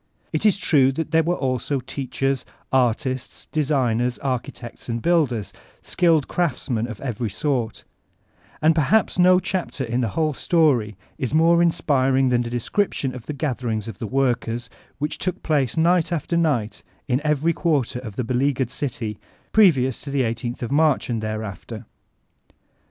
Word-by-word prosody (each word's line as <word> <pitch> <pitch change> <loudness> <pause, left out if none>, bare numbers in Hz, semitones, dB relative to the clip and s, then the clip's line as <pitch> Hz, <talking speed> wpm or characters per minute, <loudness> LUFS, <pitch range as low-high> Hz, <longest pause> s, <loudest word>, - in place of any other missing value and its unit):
It 160 +7 +2
is 200 - +3
true 135 -8 +4
that 160 +4 -3
there 165 0 +5
were 170 +2 0
also 130 0 -1
teachers, 135 +1 -2 0.3
artists, 130 0 0
designers, 125 -5 +1
architects 125 -2 -5
and 115 0 -1
builders, 130 - +1 0.3
skilled 165 -5 +2
craftsmen 125 -8 -1
of 115 -4 -8
every 120 -4 -3
sort 120 0 -2 0.8
And 160 +1 +6
perhaps 180 +6 +2
no 180 0 +6
chapter 180 -6 -3
in 120 +1 -1
the 120 - +1
whole 155 -2 +2
story 130 - +2 0.2
is 130 +3 -1
more 170 +2 +5
inspiring 135 -6 +2
than 120 -1 +2
the 120 - -4
description 130 - -1
of 125 -3 -9
the 150 - -3
gatherings 120 -7 -2
of 110 -5 -8
the 115 - -4
workers, 120 -2 -1 0.3
which 150 +2 -3
took 185 - -3
place 145 -6 0
night 170 +1 +3
after 170 0 -1
night 140 -10 0 0.3
m 130 +1 +1
every 150 +2 +2
quarter 145 -8 0
of 110 -5 -8
the 125 - -1
beleaguered 130 +1 0
dty, 125 -6 -4 0.3
previous 135 - +4
to 140 - -6
ifie 130 -5 +1
i8th 120 +1 -5
of 120 - -4
MTarch 150 -2 +2
and 115 -2 -1
thereafter. 110 -3 -5
135 Hz, 155 wpm, -23 LUFS, 120-155 Hz, 0.8 s, And